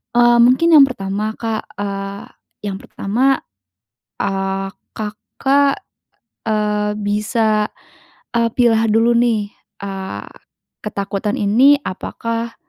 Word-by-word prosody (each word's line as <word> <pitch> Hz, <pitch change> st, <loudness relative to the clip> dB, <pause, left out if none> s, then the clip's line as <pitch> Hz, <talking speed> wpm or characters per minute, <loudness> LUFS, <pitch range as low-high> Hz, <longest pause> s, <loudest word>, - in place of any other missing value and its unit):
Eee, 240 Hz, 0 st, +6 dB
mungkin 260 Hz, +8 st, +5 dB
yang 280 Hz, -, +9 dB
pertama 210 Hz, -2 st, -3 dB
Kak, 225 Hz, -1 st, -3 dB
eee, 200 Hz, 0 st, -4 dB, 0.5 s
yang 190 Hz, -, -4 dB
pertama, 255 Hz, +7 st, 0 dB, 0.8 s
eee, 195 Hz, -1 st, -1 dB, 0.3 s
Kakak, 270 Hz, +6 st, 0 dB, 0.6 s
eee, 210 Hz, -1 st, 0 dB
bisa, 210 Hz, +1 st, +1 dB, 0.7 s
eee, 230 Hz, 0 st, +3 dB
pilah 230 Hz, -2 st, +3 dB
dulu 225 Hz, +2 st, +4 dB
nih, 225 Hz, -4 st, +1 dB, 0.3 s
eee, 195 Hz, -1 st, -5 dB, 0.6 s
ketakutan 205 Hz, 0 st, -2 dB
ini 250 Hz, +8 st, +5 dB
apakah, 230 Hz, +4 st, -4 dB
215 Hz, 95 wpm, -18 LUFS, 200-235 Hz, 0.8 s, yang